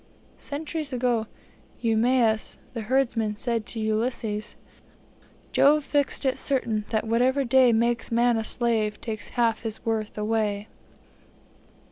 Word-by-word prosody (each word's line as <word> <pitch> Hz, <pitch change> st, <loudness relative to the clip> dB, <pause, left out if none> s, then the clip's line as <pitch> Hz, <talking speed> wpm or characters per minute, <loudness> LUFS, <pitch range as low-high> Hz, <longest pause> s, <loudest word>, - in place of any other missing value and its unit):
Centuries 300 Hz, 0 st, -4 dB
ago 240 Hz, -3 st, 0 dB, 0.5 s
Eumaeus, 225 Hz, -1 st, +2 dB, 0.2 s
the 230 Hz, -, -4 dB
herdsman, 230 Hz, -3 st, 0 dB
said 230 Hz, 0 st, -2 dB
to 230 Hz, -, -5 dB
Ulysses: 220 Hz, -1 st, -2 dB, 1.0 s
Jove 295 Hz, +1 st, +4 dB
fixed 285 Hz, -1 st, 0 dB
it 260 Hz, -1 st, +1 dB
certain, 235 Hz, -6 st, -1 dB
that 220 Hz, -1 st, 0 dB
whatever 250 Hz, +5 st, +2 dB
day 255 Hz, -1 st, +5 dB
Makes 235 Hz, +1 st, +1 dB
man 235 Hz, +1 st, +3 dB
a 225 Hz, -, -1 dB
slave, 220 Hz, -3 st, -1 dB
takes 215 Hz, -2 st, -6 dB
half 230 Hz, -2 st, +2 dB
his 220 Hz, -1 st, -6 dB
worth 220 Hz, -2 st, -2 dB
away. 210 Hz, -1 st, -1 dB
230 Hz, 120 wpm, -26 LUFS, 220-255 Hz, 1.0 s, day